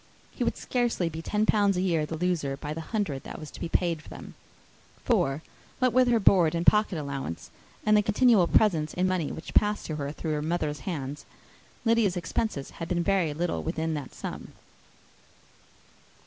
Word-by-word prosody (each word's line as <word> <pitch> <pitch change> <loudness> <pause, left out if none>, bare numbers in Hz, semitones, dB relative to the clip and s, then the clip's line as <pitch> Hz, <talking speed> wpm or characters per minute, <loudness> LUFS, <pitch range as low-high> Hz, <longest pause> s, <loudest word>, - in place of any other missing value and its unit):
He - - -3
would - - -1
scarcely 240 -8 0
be 160 0 -6
ten 210 +5 0
pounds 205 -3 +3
a - - +1
year 165 -5 +1
the 160 - -4
loser, 160 -6 -1
by 150 +2 -5
the 165 - -5
hundred 160 -7 -2
that - - -8
was 155 - -9
to - - -11
be - - -4
paid 170 -2 +1
them; 155 - -11 0.7
for, 135 +3 +1 0.3
what 255 -2 +2
with 255 0 +5
her 235 -2 +4
board 175 -5 +4
and 170 +1 -1
pocket 210 -4 +4
allowance, 135 - -5 0.3
and 215 0 +5
the 210 - +6
continual 210 -2 +4
presents 160 -8 +2
in 180 +1 +2
money 180 -5 -1
which 160 - -8
passed 210 0 +2
to 155 - -4
her 140 -1 -3
through 155 +1 -4
her 150 - -1
mother's 155 -2 -1
hands, 145 -4 -4 0.6
Lydia's 225 -5 +3
expenses 170 -3 -2
had 165 - -6
been 175 0 0
very 185 -4 +2
little 170 +3 -2
within 160 0 -2
that 145 -4 -6
sum. - - -7
170 Hz, 185 wpm, -27 LUFS, 150-205 Hz, 0.7 s, the